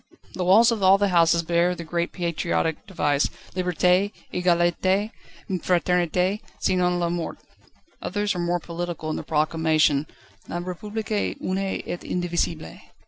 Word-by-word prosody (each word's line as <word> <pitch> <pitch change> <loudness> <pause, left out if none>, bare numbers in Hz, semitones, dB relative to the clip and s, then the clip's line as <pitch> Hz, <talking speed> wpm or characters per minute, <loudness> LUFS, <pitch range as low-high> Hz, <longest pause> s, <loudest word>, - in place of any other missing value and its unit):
The 185 - -2
walls 215 +6 +6
of 225 -3 -2
all 190 +1 +6
the 200 0 +1
houses 170 -1 +4
bear 170 +2 +2
the 170 - -7
great 170 +1 -2
patriotic 170 -2 -1
device: 145 -6 +1 0.3
"Liberté, 180 +2 +2 0.2
Egalité, 180 +3 +2 0.4
Fraternité, 180 +1 +1 0.2
sinon 180 -1 +1
La 170 -1 0
Mort"; 175 -1 -3 0.6
others 205 +1 -1
are 180 - -4
more 175 0 0
political 170 -1 -5
in - - -2
their - - -4
proclamation: 155 -1 +2 0.4
"La - - -4
République 210 +4 -3
une 185 +1 -2
et 190 -2 -4
indivisible." 170 - -2
175 Hz, 135 wpm, -24 LUFS, 170-185 Hz, 0.6 s, walls